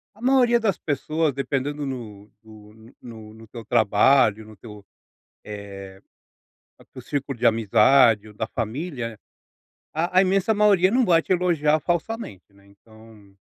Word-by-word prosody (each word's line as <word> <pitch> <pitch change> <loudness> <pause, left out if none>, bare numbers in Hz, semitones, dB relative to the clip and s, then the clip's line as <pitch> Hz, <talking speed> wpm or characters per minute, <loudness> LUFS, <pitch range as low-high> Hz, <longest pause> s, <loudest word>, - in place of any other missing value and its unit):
a 215 - -20
maioria 250 -2 +3
das 215 -4 -1
pessoas 155 +1 -2
dependendo 140 +2 -3
no 110 -6 -8
do 105 -1 -16
no 110 +2 -18
no 110 -3 -12
no 110 0 -15
teu 115 +1 -10
trabalho 110 0 +2
no 110 0 -15
teu, 105 -1 -13 0.6
eh, 100 -2 -10 0.8
é - - -19
do - - -10
círculo 140 -2 -5
de 120 - -3
amizade 115 0 +3
ou - - -15
da 110 +1 -4
família, 120 - -5 0.7
a 170 +4 +1
a - - +6
imensa 195 +3 +1
maioria 205 -3 +3
não 250 +1 +2
vai 170 -4 +3
te 185 - -1
elogiar 160 -4 +1
falsamente, 170 - -5
né, 100 0 -23
então 110 0 -19
120 Hz, 150 wpm, -23 LUFS, 105-165 Hz, 0.8 s, a